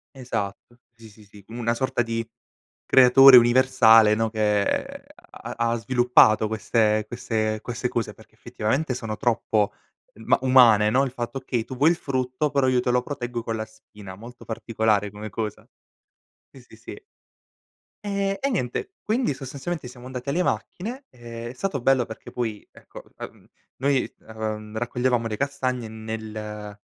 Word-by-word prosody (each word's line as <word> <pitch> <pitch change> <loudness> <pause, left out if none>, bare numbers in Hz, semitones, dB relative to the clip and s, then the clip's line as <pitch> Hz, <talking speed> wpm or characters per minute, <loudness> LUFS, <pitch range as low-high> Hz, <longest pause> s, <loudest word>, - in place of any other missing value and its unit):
Esatto. 120 -3 -5 0.2
Sì, 115 -1 -15
sì, 105 +1 -18
sì. 100 0 -17
Una 115 0 -2
sorta 125 0 -1
di 115 -1 -3 0.6
creatore 130 +1 +8
universale, 120 -3 +6
no, 115 +1 0
che 105 -2 -1
ha - - -10
ha 115 0 +1
sviluppato 120 -2 +4
queste 110 -1 +1
queste 110 -2 -2
queste 120 +2 -3
cose, 120 -2 -3
perché - - -20
effettivamente 130 +6 -2
sono 115 -3 -5
troppo 110 -4 0 0.4
ma 110 +2 +1
umane, 120 -5 +6
no. 130 +5 +2
Il 130 - -5
fatto 120 +1 -5
che 125 -3 -2
tu 125 +3 -9
vuoi 150 +5 +5
il - - +1
frutto, 130 0 -2
però 140 -2 +2
io 125 -1 +2
te 125 - 0
lo 125 0 +2
proteggo 125 -3 -5
con 115 -1 -3
la 110 0 -4
spina, 105 -3 -13
molto 120 +4 -12
particolare 110 -2 -1
come 105 +1 -8
cosa. 110 0 -5 0.8
Sì, 135 - -16
sì, 120 - -18
sì. 120 - -10 1.0
E 200 -1 -1
e, 275 - +1
niente 195 - -3
quindi 230 - 0
sostanzialmente 140 +3 -6
siamo 125 0 -12
andati 130 +1 -6
alle 170 +6 +1
macchine 235 +9 -3
e 120 -1 -8
è - - -8
stato 140 +1 -3
bello 135 -1 +3
perché 110 -1 -10
poi 115 -4 -4
ecco, - - -13
ehm, - - -10 0.3
noi, 135 0 0 0.2
ehm, 110 -1 -5
raccoglievamo 120 0 0
le 110 -1 -4
castagne 130 -4 -2
nel 110 -1 -7
120 Hz, 155 wpm, -24 LUFS, 110-130 Hz, 1.0 s, creatore